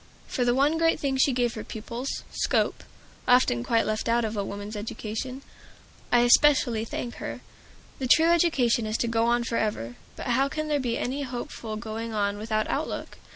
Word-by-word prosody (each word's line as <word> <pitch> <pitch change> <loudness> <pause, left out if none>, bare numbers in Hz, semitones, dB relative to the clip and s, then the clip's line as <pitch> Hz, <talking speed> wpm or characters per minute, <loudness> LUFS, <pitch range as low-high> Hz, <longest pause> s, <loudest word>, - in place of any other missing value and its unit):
For 250 - -1
the 245 0 +2
one 290 +4 +2
great 330 0 +3
thing 270 -2 0
she 270 +1 +4
gave 245 -2 0
her 220 - -6
pupils, 235 +4 -5
scope, - - 0 0.4
often 245 - +4
quite 230 - +2
left 215 +1 -1
out 235 0 +2
of 215 - -3
woman's 205 +1 -4
education, 225 +5 -5 0.7
I 240 - +5
especially 240 -2 +4
thank 235 +1 -5
her. - - -6 0.6
The 260 - -1
true 320 +6 +6
education 265 -10 +2
is 215 +1 -1
to 235 - 0
go 230 0 +1
on 240 0 +2
forever. 210 - -2 0.2
But - - -7
how 265 +3 +2
can 310 +1 -3
there 295 -1 +2
be 245 -3 -1
any 270 +3 -2
hopeful 240 -4 -5
going 225 0 -5
on 205 0 0
without 215 0 -1
outlook? - - -3
235 Hz, 180 wpm, -26 LUFS, 220-265 Hz, 0.7 s, true